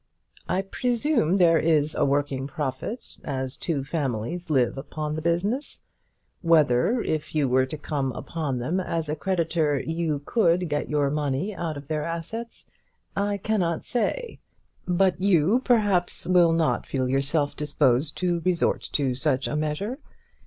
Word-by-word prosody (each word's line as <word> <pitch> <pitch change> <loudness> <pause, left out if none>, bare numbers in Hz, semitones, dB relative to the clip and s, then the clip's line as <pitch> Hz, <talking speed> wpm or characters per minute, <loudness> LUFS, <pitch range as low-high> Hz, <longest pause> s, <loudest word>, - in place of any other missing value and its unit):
I 190 - +1
presume 235 - +1
there 170 -3 +5
is 155 -2 +2
a - - +1
working 140 -1 0
profit, 145 - -5
as 130 -2 -3
two 155 -6 -2
families 145 +3 -3
live 130 -5 +2
upon 150 +2 -4
the 155 - -3
business. 195 - -1 0.6
Whether, 165 - +3
if 155 0 -3
you 145 -3 +2
were 130 +1 +3
to 155 - -5
come 140 -2 -2
upon 150 -6 -3
them 155 +10 -1
as 165 -4 -2
a 150 - 0
creditor, 165 -4 0
you 160 -1 -2
could 180 -6 +2
get 145 0 -2
your 145 -2 +1
money 150 +6 -1
out 160 -4 -3
of 140 -1 -10
their 155 -1 -1
assets, 195 +8 -5 0.5
I 200 0 0
cannot 190 -5 -1
say; 475 - -2 0.5
but 180 0 +2
you, 195 +4 +3
perhaps, 205 -8 +2
will 175 -2 +5
not 165 -1 +1
feel 130 -2 -1
yourself 140 +3 +1
disposed 145 -1 +1
to 175 -2 0
resort 180 -2 +1
to 135 -3 +1
such 135 0 +1
a - - -2
measure. 155 - -2
160 Hz, 150 wpm, -25 LUFS, 145-180 Hz, 0.6 s, there